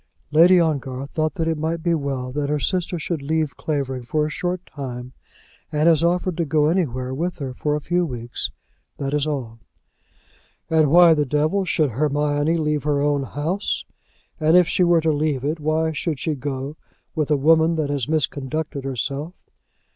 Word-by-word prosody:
"Lady 175 +4 +7
Ongar 140 -5 -1
thought 155 +3 -2
that 165 -3 -1
it 160 -2 -1
might 160 +1 -2
be 170 - +2
well 135 -4 -2
that 145 +1 -2
her 150 - +1
sister 180 +4 -1
should 160 -1 -3
leave 155 0 -1
Clavering 135 -4 -2
for 150 +5 0
a 155 - -3
short 180 +3 -3
time, 125 -3 -7 0.6
and 150 +1 +2
has 165 -1 +4
offered 175 +1 +1
to 170 - +1
go 150 0 +2
anywhere 130 -8 -1
with 170 +6 -2
her 135 -4 -5
for 150 +3 -1
a - - -1
few 175 +3 +1
weeks. 120 -6 -4 0.5
That 140 0 -3
is 150 0 +1
all." 125 -6 -4 1.1
"And 155 -2 +4
why 170 +1 +7
the 150 -1 +2
devil 155 +8 +1
should 155 -5 +1
Hermione 145 +4 +1
leave 150 -2 0
her 145 0 0
own 145 0 +1
house? 155 - -2 0.5
And 160 +2 +5
if 180 -2 +5
she 180 - +2
were 170 -1 +4
to 160 0 +2
leave 145 -3 0
it, 155 +2 -1
why 155 +1 0
should 155 0 -2
she 155 +5 -1
go 140 +1 -5 0.4
with 155 -3 -1
a 150 - +3
woman 160 +3 +4
that 150 -3 -1
has 140 -5 -1
misconducted 150 -1 -2
herself?" 140 +5 -3
150 Hz, 185 wpm, -22 LUFS, 140-160 Hz, 1.1 s, Lady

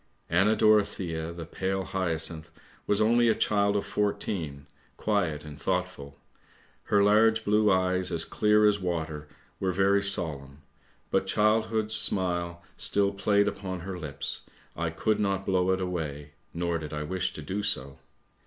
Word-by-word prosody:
" - - -42
Anna 95 +6 +4
Dorothea, 100 -7 +2
the 85 -1 -7
pale 95 +3 -2
hyacinth, 85 -4 -1 0.4
was 105 - +2
only 120 +2 +4
a 110 - +4
child 100 -1 +1
of 100 - 0
fourteen, 85 -8 -2 0.3
quiet 90 -9 0
and 75 -1 -10
thoughtful. 90 -7 -3 0.7
Her 100 -1 +3
large 110 +2 +4
blue 105 +1 +3
eyes 95 0 +1
as 85 -1 -1
clear 105 0 +3
as 105 -1 +3
water 80 -4 -3 0.3
were 95 -1 0
very 100 +2 +3
solemn, 75 -8 -1 0.5
but 95 0 +1
childhood's 110 +1 +1
smile 85 -4 -1
still 100 -1 +2
played 100 +1 +2
upon 95 -3 -4
her 90 0 -6
lips, 75 -4 -4 0.3
I 85 0 -1
could 105 +6 0
not 100 -2 0
blow 95 -1 +1
it 95 0 +2
away, 75 -6 -4 0.2
nor 85 0 -1
did 75 -1 -7
I 75 0 -3
wish 90 +3 -2
to 75 - -8
do 95 +7 -3
so. 70 -8 -2
95 Hz, 155 wpm, -28 LUFS, 80-105 Hz, 0.7 s, Anna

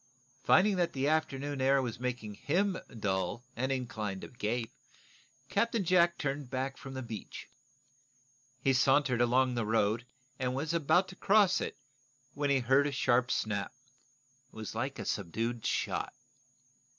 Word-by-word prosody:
Finding 195 +5 +4
that 175 -1 +1
the 135 +1 0
afternoon 145 -3 0
air 135 +1 +4
was 120 -3 -3
making 125 -4 -3
him 185 - 0 0.2
dull 95 +2 -1
and 130 +3 -1
inclined 110 -7 -3
to - - -8
gape, 115 0 -2 0.8
Captain 230 +4 +1
Jack 175 -1 +4
turned 140 -2 -3
back 130 +2 -2
from 135 -1 -9
the 130 - -4
beach. 115 -4 -7 1.1
He 135 +1 +2
sauntered 135 -1 +3
along 125 +1 +3
the 120 -2 -1
road, 110 +2 +1 0.3
and 125 0 -1
was 150 +4 -2
about 170 +3 +3
to 185 - -10
cross 200 -1 +4
it, - - -4 0.6
when 145 0 -1
he 135 -2 +3
heard 135 +4 +4
a - - -2
sharp 125 -2 +2
snap. 100 -4 -1 0.8
It - - -21
was 110 -1 -6
like 130 +5 -3
a - - -5
subdued 115 +5 -2
shot. - - -1
130 Hz, 150 wpm, -31 LUFS, 115-145 Hz, 1.1 s, Finding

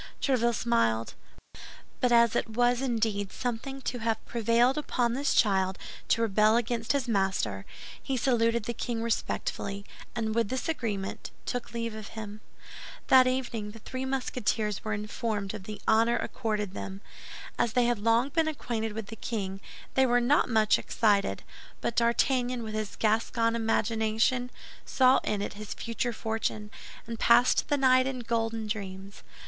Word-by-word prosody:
Tréville 235 -4 +2
smiled; 115 - +1 0.9
but 250 - +2
as 235 -1 +5
it - - 0
was 245 +2 +2
indeed 220 -6 -1
something 255 +3 -4
to 245 - -3
have 225 0 -1
prevailed 235 +3 +2
upon 245 -5 0
this 275 +3 0
child 190 -3 +3 0.3
to 230 - +2
rebel 215 +1 +4
against 235 0 -1
his 275 -3 -1
master, 190 - 0 0.3
he 270 - -2
saluted 235 -2 +2
the 235 - -3
king 230 0 -3
respectfully, 200 -3 -2 0.3
and 220 -2 -1
with 230 -2 +1
this 260 +4 -2
agreement, 215 -11 -3 0.2
took 245 -1 -4
leave 230 -1 -3
of 215 -1 -7
him. 215 -1 -7 0.7
That 255 -1 +7
evening 235 -5 -2
the - - -10
three 255 +4 -5
Musketeers 240 -5 -1
were 215 - -2
informed 210 -1 -3
of 205 -3 -8
the 210 0 -7
honor 230 +2 +4
accorded 210 -5 -2
them. 195 0 -6 0.6
As 230 - +1
they 245 -1 +3
had 240 -2 +1
long 230 +5 +2
been 320 +2 +1
acquainted 230 -8 -3
with 220 0 -5
the 225 - -8
king, 195 -4 -4 0.3
they 265 0 +4
were 245 0 +4
not 260 +3 +3
much 220 -2 +3
excited; 205 -3 +1 0.4
but 235 - -2
D'Artagnan, 245 +1 +2
with 215 -1 -6
his 215 -1 -3
Gascon 230 +1 +1
imagination, 225 +2 +1 0.3
saw 260 0 +4
in 205 -1 -1
it - - -4
his 210 0 -7
future 235 +1 -2
fortune, 220 -2 -3 0.3
and 230 -1 -6
passed 240 +2 +4
the 290 - +2
night 255 -1 +4
in 260 -2 -3
golden 225 -1 -1
dreams. 195 -2 -6
230 Hz, 155 wpm, -28 LUFS, 215-245 Hz, 0.9 s, That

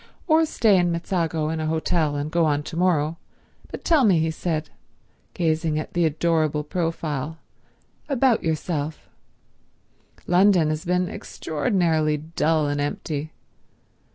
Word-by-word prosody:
"Or 320 -1 +4
stay 215 -9 +3
in 175 -1 +2
Mezzago 165 -2 -1
in 160 0 -2
an 155 - -2
hotel 160 -1 0
and 145 +1 -3
go 170 0 +2
on 145 -1 +1
to 160 - -8
morrow. 165 -2 +1 0.5
But - - -8
tell 315 -5 +4
me," 195 -7 +5
he 160 0 +1
said, 155 -1 -3 0.6
gazing 160 -2 0
at 155 - -5
the 175 -1 +2
adorable 155 -1 +1
profile, 160 -3 -3 0.7
"about 260 -4 +3
yourself. 155 -1 -3 1.2
London 180 -3 +4
has 155 +3 -3
been 180 +1 +1
extraordinarily 160 -3 -1
dull 155 0 0
and 145 0 -1
empty. 145 +1 -3
160 Hz, 130 wpm, -23 LUFS, 155-175 Hz, 1.2 s, me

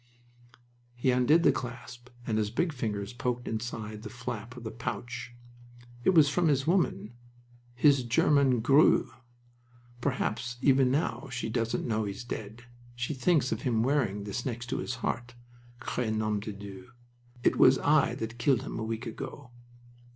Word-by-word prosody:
He 125 +2 +1
undid 125 +7 +4
the - - +6
clasp, 120 0 -7 0.2
and 110 -1 0
his 105 -1 0
big 160 +9 0
fingers 105 -4 -3
poked 125 -1 -3
inside 110 -2 -4
the 110 - -7
flap 120 +1 -6
of 120 - -9
the 110 - -5
pouch. 120 +1 -5 0.7
"It 185 - +3
was 155 -3 +7
from 170 +4 +2
his 140 -3 +2
woman, 155 - +1 0.6
his 140 +1 +5
German 125 +1 +3
grue. 135 0 +4 0.9
Perhaps 120 -2 -2
even 135 -1 +4
now 140 +1 -1
she 120 -2 -3
doesn't 115 +1 -1
know 110 -2 0
he's 100 +2 -5
dead. 110 0 -7 0.3
She 120 +4 -2
thinks 140 -1 +2
of - - -2
him 115 -5 +1
wearing 120 -7 0
this 105 +4 -4
next 120 -1 -4
to - - -1
his 125 - -3
heart. 120 -1 -3 0.4
'Cre 125 -1 -2
nom 110 -1 0
de 105 +1 -5
Dieu! 100 -1 -10 0.5
It - - +3
was 130 +1 +7
I 145 0 +3
that 115 +1 -6
killed 130 -1 +2
him - - -5
a - - -3
week 115 +2 -4
ago!" 130 +2 -7
120 Hz, 160 wpm, -29 LUFS, 110-135 Hz, 0.9 s, was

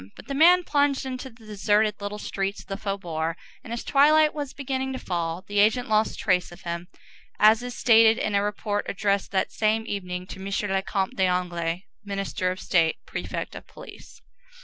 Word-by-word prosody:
But - - -13
the 275 - -3
man 350 +5 +6
plunged 285 -4 +1
into 260 0 -5
the 230 -2 -18
deserted 210 0 +1
little 205 +1 -4
streets 195 -1 -3
of - - -17
the 195 - -5
faubourg, 170 -5 -3 0.3
and - - -10
as 235 - -3
twilight 305 +2 +5
was 290 -3 -4
beginning 265 -1 -3
to - - -3
fall, 170 -4 -3
the 205 0 0
agent 220 +4 +3
lost 215 0 +2
trace 180 -4 +1
of 175 - -13
him, 170 0 -4 0.5
as 215 +2 +6
is 245 0 -6
stated 225 -1 +5
in 215 - -1
a 200 - +3
report 205 0 -2
addressed 200 0 0
that 190 -1 0
same 220 +1 +1
evening 180 -4 -4
to 190 - -9
M. 190 - -8 0.3
le 195 0 +1
Comte 190 0 -2
d'Anglès, 180 -2 0 0.2
Minister 195 -2 -2
of 185 +1 -4
State, 165 -4 +2
Prefect - - -5
of - - -10
Police. - - -13
205 Hz, 190 wpm, -25 LUFS, 185-240 Hz, 0.5 s, man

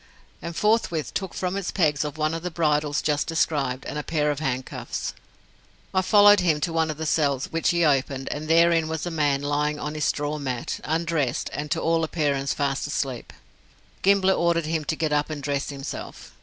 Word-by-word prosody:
And 170 0 -6
forthwith 210 -8 +1
took 190 -3 -3
from 180 0 -2
its 200 -2 -2
pegs 150 -6 +1
one 155 +1 -1
of 165 - -3
the 180 - -3
bridles 150 -3 0
just 150 -1 0
described, 140 -6 0
and 150 - -4
a - - -4
pair 150 -2 0
of 145 - -3
handcuffs. 130 -3 -3 0.8
I 185 - +3
followed 205 +1 +6
him 165 -4 +2
to 165 - -1
one 160 -1 +1
of 155 - -4
the 160 - -4
cells, 140 -4 +1
which 165 0 +1
he 170 -1 +3
opened, 135 -2 +1
and 150 +1 -4
therein 165 0 +4
was 160 +1 -3
a 175 - -3
man 145 -3 +1
lying 150 +1 0
on 150 +1 -4
his 155 -1 -1
straw 145 +1 -1
mat, 130 -4 -3
undressed, 160 -5 -1
and 150 0 -4
to - - 0
all 165 0 +1
appearance 145 -4 0
fast 140 -1 -1
asleep. 135 -4 -3 0.7
Gimblett 190 -1 +4
ordered 170 -1 +2
him 160 -1 -2
to 160 - -1
get 155 -1 -1
up 150 +1 +1
and 150 -2 -5
dress 140 0 -1
himself. 140 -1 -7
155 Hz, 195 wpm, -25 LUFS, 145-165 Hz, 0.8 s, followed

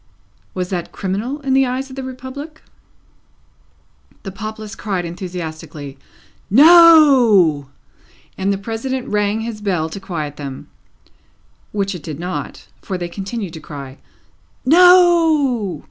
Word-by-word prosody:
Was 180 -1 -3
that 175 -2 -4
criminal 215 +9 -4
in 270 -2 -1
the 265 0 +3
eyes 260 +2 -4
of - - -9
the 270 - -5
Republic? 260 +4 -9 1.6
The 195 - -6
populace 215 +2 -7
cried 195 -5 -3
enthusiastically, 160 -5 -7 0.5
"No!" 265 - +6 0.7
and 195 +1 -1
the 200 - -1
President 235 +5 -4
rang 210 +1 0
his 225 -2 -6
bell 180 -6 -1
to 180 - -7
quiet 160 -7 -5
them. 140 -2 -8 1.0
Which 200 -1 -2
it 180 - -8
did 150 0 -7
not, 180 +1 -6
for 190 - -4
they 175 -1 -5
continued 195 0 -6
to 160 - -8
cry 140 -3 -10 0.7
"No!" 320 - +4
205 Hz, 125 wpm, -18 LUFS, 175-260 Hz, 1.6 s, No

